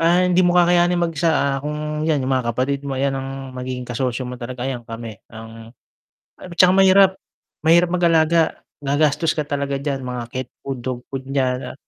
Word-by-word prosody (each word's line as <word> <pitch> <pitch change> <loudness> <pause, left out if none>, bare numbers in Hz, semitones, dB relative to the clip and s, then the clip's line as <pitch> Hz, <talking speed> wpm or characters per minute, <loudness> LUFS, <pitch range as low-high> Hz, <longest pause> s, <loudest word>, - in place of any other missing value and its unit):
ah, 170 +2 +4
hindi 180 0 +3
mo 175 0 +3
kakayanin 175 0 +4
mag-isa, 165 -1 +1
ah, 140 -3 +1
kung 150 0 -3
yan 145 -4 +1
yung 135 - -1
mga 125 -2 0
kapatid 135 +2 -1
mo, 135 - -3
ayan 135 0 0
ang 135 0 -4 0.3
magiging 125 0 -5
kasosyo 125 +1 -2
mo 125 - -6
talaga, 125 +1 -5
ayan 125 -3 -4
kami 115 -2 -8
ang 115 0 -11 0.7
at 180 - -11
tsaka 180 +1 +5
mahirap, 195 0 +6 0.5
mahirap 170 +2 +5
mag-alaga, 165 -2 +2 0.2
gagastos 150 +3 +2
ka 150 -2 -3
talaga 140 -1 -2
diyan 140 -2 -3
mga 125 -1 -4
cat 130 0 -5
food, 135 -3 -6
dog 125 -2 -3
food 135 -1 -6
niyan 130 -1 -1
ah - - -13
140 Hz, 185 wpm, -21 LUFS, 130-165 Hz, 0.7 s, mahirap